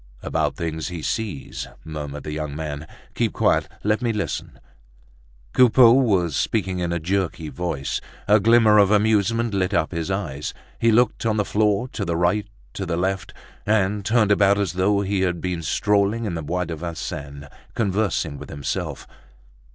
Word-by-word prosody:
"About - - 0
things 80 -1 -3
he 85 -3 -6
sees," 105 -11 -3 0.2
murmured 75 -2 -6
the 75 - -5
young 75 -1 -4
man. 75 -1 -5 0.3
"Keep - - 0
quiet, - - +2 0.2
let 105 +3 +1
me 120 -2 +1
listen." 105 -3 -4 0.9
Coupeau 125 -1 +7
was 95 - +2
speaking 95 -5 0
in 85 -1 -1
a 85 - 0
jerky 85 -2 -2
voice. 80 -6 -3 0.3
A 105 +2 +6
glimmer 110 0 +5
of 100 -2 +5
amusement 110 +2 +2
lit 95 +1 0
up 80 - +1
his 85 0 -3
eyes. 75 -8 -3 0.2
He 115 - +4
looked 120 +3 +2
on 110 -1 +1
the 105 - +1
floor, 105 +3 +1
to 105 - -4
the 85 -3 -1
right, 90 +5 +1 0.3
to 95 - -4
the 85 -1 -1
left, 95 +2 -1 0.3
and 105 -1 +1
turned 110 -1 +3
about 100 -1 +4
as 100 -2 -1
though 100 +2 +2
he 100 -1 -1
had 90 -2 0
been 90 -1 -3
strolling 105 +7 +1
in 100 - -2
the 80 - -3
Bois 90 +4 -2
de 85 0 -4
Vincennes, 75 -3 -6 0.3
conversing 95 -8 0
with - - -9
himself. 70 -2 -4
95 Hz, 170 wpm, -23 LUFS, 85-105 Hz, 0.9 s, Coupeau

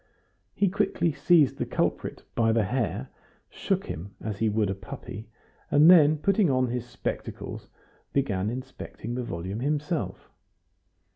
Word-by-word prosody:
He 200 - +3
quietly 175 -3 +1
seized 150 0 +3
the - - 0
culprit - - -2
by 115 -1 +2
the 115 -1 +3
hair, 120 +2 -2 0.4
shook - - -1
him 95 +6 -7
as 105 -2 -5
he 110 - +2
would 105 -2 +1
a - - 0
puppy, 100 +2 -9 0.4
and 150 +4 +7
then, 155 -3 +7
putting 195 +3 +2
on 130 -2 +2
his 125 0 -3
spectacles, - - -5 0.4
began 105 -8 0
inspecting 125 -2 -6
the 125 - -2
volume 95 -2 -4
himself. 150 +4 -2
125 Hz, 140 wpm, -27 LUFS, 105-150 Hz, 0.4 s, and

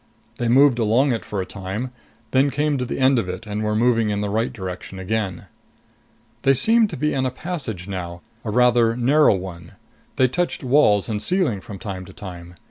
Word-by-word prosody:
They 120 - 0
moved 130 +1 +5
along 120 +5 +3
it 115 -3 -2
for 105 -2 -3
a - - -4
time, 100 +6 -5 0.4
then 135 +2 +3
came 145 0 0
to 125 - -1
the - - -4
end 130 -1 +4
of 95 -5 -3
it 90 +2 -6
and 105 0 -4
were 105 0 0
moving 115 -1 +2
in 100 0 -1
the 105 -1 -2
right 115 +4 0
direction 95 -4 -7
again. 95 -2 -3 1.0
They 135 0 +4
seemed 225 - +4
to - - -6
be 150 +3 0
in 130 - 0
a 130 - +1
passage 125 - -5
now, 90 -3 -5 0.2
a 110 - -4
rather 120 0 +3
narrow 135 0 +4
one. 90 -3 -8 0.4
They 130 - +4
touched 170 +5 -2
walls 125 -7 +3
and 105 -2 -2
ceiling 180 - 0
from 100 +1 -9
time 95 -4 -6
to - - -13
time. 90 -4 -10
115 Hz, 205 wpm, -22 LUFS, 95-130 Hz, 1.0 s, moved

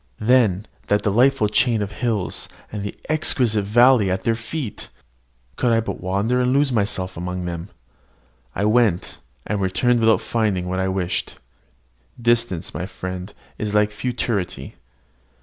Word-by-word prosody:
Then, 110 -4 +3 0.2
that 105 0 +2
delightful 110 +2 +3
chain 110 0 +2
of 100 - -5
hills, 110 -4 -2 0.2
and 105 - -4
the 100 - -5
exquisite 125 -8 +2
valleys 120 0 +5
at 95 +1 -1
their 115 - +2
feet! 115 +2 -5 0.7
Could 125 - +2
I 115 - +4
but 115 - -4
wander 100 +7 0
and 125 0 +2
lose 140 0 +3
myself 100 -5 -1
amongst 90 +1 -4
them! 85 +1 -5 0.9
I 100 - 0
went, 110 -5 +2 0.3
and 105 -2 -2
returned 120 +6 +2
without 110 -1 +4
finding 105 -6 -1
what 95 +1 -2
I 95 - 0
wished. 95 -2 -2 0.8
Distance, 115 -7 0
my 90 - -4
friend, 95 0 -6 0.3
is 105 -1 -2
like 105 0 +3
futurity. 110 -4 -3
105 Hz, 145 wpm, -22 LUFS, 95-120 Hz, 0.9 s, valleys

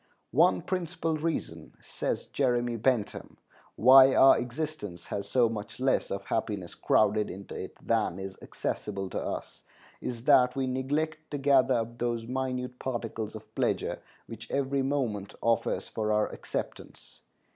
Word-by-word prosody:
"One 90 -1 +4
principal 170 -3 -2
reason," 160 +1 -3
says - - -3
Jeremy 120 -3 0
Bentham, 115 -1 -1 0.4
"why 130 +3 +8
our 135 - +8
existence 120 - -4
has 100 0 -4
so 125 -2 +4
much 110 0 -6
less 130 +1 +1
of 100 0 -3
happiness 100 -4 -3
crowded 105 0 +2
into 95 +2 -8
it - - -6
than 110 -6 +1
is 95 0 -6
accessible 95 -2 -4
to - - -2
us, - - -5 0.4
is 120 -2 -5
that 130 -2 +5
we 135 -1 0
neglect 150 +5 -2
to 145 - -3
gather 135 -2 +4
up 115 0 -3
those 120 -1 -1
minute 125 0 -3
particles 115 -4 -4
of 110 - -11
pleasure - - -1 0.3
which 115 -1 -10
every 140 0 0
moment 125 -8 -2
offers 115 0 0
for 110 -1 -2
our 105 0 +2
acceptance. - - -7
120 Hz, 145 wpm, -29 LUFS, 110-135 Hz, 0.4 s, why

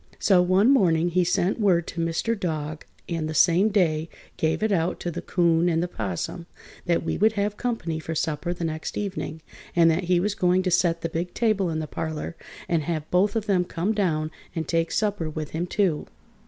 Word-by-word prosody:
So 190 -3 +4
one 185 +7 +4
morning 175 -10 +3
he 180 +1 +2
sent 180 +4 +1
word 180 -6 +3
to 170 - -4
Mr. 165 +7 0
Dog, 155 -6 -4 0.2
and 165 -2 -2
the 155 - -4
same 180 +6 +4
day 165 -6 +1 0.3
gave 160 +6 0
it 220 - +1
out 175 -2 0
to 175 - -2
the - - -5
'Coon 170 -1 +2
and 165 0 +1
the - - -1
'Possum 110 - -4 0.4
that 170 -1 +2
we - - -2
would 215 +2 +4
have 205 0 -1
company 205 -10 -2
for 160 0 -5
supper 155 +2 -1
the 175 -1 -4
next 160 -1 -3
evening, 185 -5 -4 0.3
and 165 -1 +6
that 175 +3 -1
he 175 0 +3
was 200 +3 0
going 180 -1 +2
to 185 - 0
set 175 -1 +2
the 165 - -2
big 170 +2 -4
table 215 -6 +1
in 160 - -2
the 155 - -2
parlor 155 +4 -4 0.3
and 170 -2 +1
have 155 -3 -3
both 200 +4 +3
of 220 -2 -1
them 190 -4 +2
come 180 +4 -2
down 160 -7 0 0.2
and 160 -2 -3
take 165 0 0
supper 205 -7 0
with 155 -1 -5
him, 170 +3 -2
too. 180 -5 0
175 Hz, 210 wpm, -25 LUFS, 160-190 Hz, 0.4 s, and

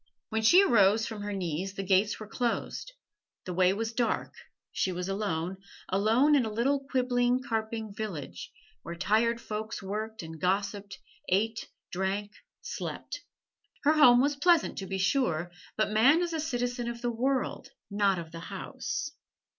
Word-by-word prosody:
When 220 0 0
she 350 - +7
arose 220 - +4
from 215 -2 -6
her 205 0 -4
knees 190 0 -3
the 195 - -3
gates 195 +2 +2
were 215 - -6
closed; 240 - -2 0.5
the 180 - -4
way 180 +1 +4
was 225 +3 -2
dark; 235 -2 -1 0.4
she 190 - 0
was 180 0 -3
alone 190 -3 -2 0.3
alone 225 +10 +3
in 280 -3 +5
a 220 - -3
little 260 +6 +1
quibbling, 250 -1 +2
carping 220 -2 -3
village, 200 -8 -6 0.3
where 170 - -7
tired 225 +6 +2
folks 215 -2 -5
worked 215 +1 -4
and 160 -1 -9
gossiped, 200 +2 -1 0.3
ate, 220 +5 0 0.2
drank, 195 +3 -2 0.3
slept. - - -5 0.6
Her 295 +2 +5
home 250 -6 +7
was 285 +2 +2
pleasant, 335 +3 +3
to 195 - -5
be 190 +1 -2
sure, 180 - +1 0.3
but 215 -1 +1
man 270 +11 +5
is 340 -1 -3
a 320 - -1
citizen 245 -5 -2
of 235 0 -7
the 240 - +1
world, 260 +2 -1 0.2
not 200 -2 +2
of 165 -1 -7
a 165 - -6
house. 290 - -5
215 Hz, 160 wpm, -29 LUFS, 195-245 Hz, 0.6 s, she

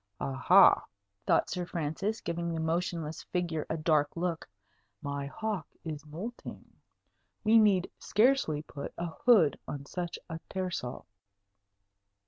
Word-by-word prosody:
"Aha!" 155 +9 +5 0.4
thought - - +4
Sir 180 - -2
Francis, 175 +6 -2
giving 170 0 -2
the - - -2
motionless 160 -1 -2
figure 170 -4 -2
a 160 - -1
dark 155 -1 +1
look, 170 - -2 0.5
"my 140 +1 -4
hawk 210 +3 -3 0.2
is 155 -2 -6
moulting. 190 +11 -7 0.8
We 220 +1 +6
need 195 -4 +4
scarcely 210 - +2
put 140 -2 -8
a 170 0 -2
hood 190 - +4
on 140 -1 -5
such 175 +3 -4
a 165 -1 -5
tersel." 180 -10 -4
170 Hz, 120 wpm, -30 LUFS, 155-190 Hz, 0.8 s, We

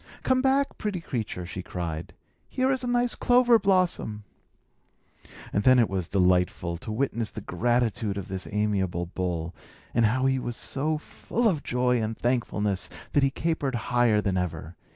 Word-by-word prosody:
"Come 260 0 +3
back, 270 +1 +1
pretty 205 -4 -2
creature!" 110 - -4
she 90 +1 -6
cried. 85 -3 -5 0.3
"Here 260 +1 +1
is 260 -1 -1
a - - -2
nice 245 0 +2
clover 245 -1 +4
blossom." 185 - +1 1.3
And 100 - +2
then 130 +4 +6
it 115 -3 +4
was 95 -3 -3
delightful 90 -2 +1
to 110 - -7
witness 115 -1 -1
the - - -7
gratitude 110 0 0
of 100 - -5
this 95 -1 -4
amiable 100 -4 0
bull, 85 -1 -3 0.4
and 115 -1 +3
how 130 +4 +1
he 135 0 +2
was 120 -2 -4
so 155 +3 -1
full 230 +9 -2
of 165 -9 +1
joy 125 -2 +1
and 110 +1 -3
thankfulness 105 -5 -1 0.2
that 145 - +3
he 135 - +4
capered 140 -2 -1 0.2
higher 120 -4 +4
than 95 -3 0
ever. 90 -2 -3
115 Hz, 165 wpm, -27 LUFS, 95-155 Hz, 1.3 s, then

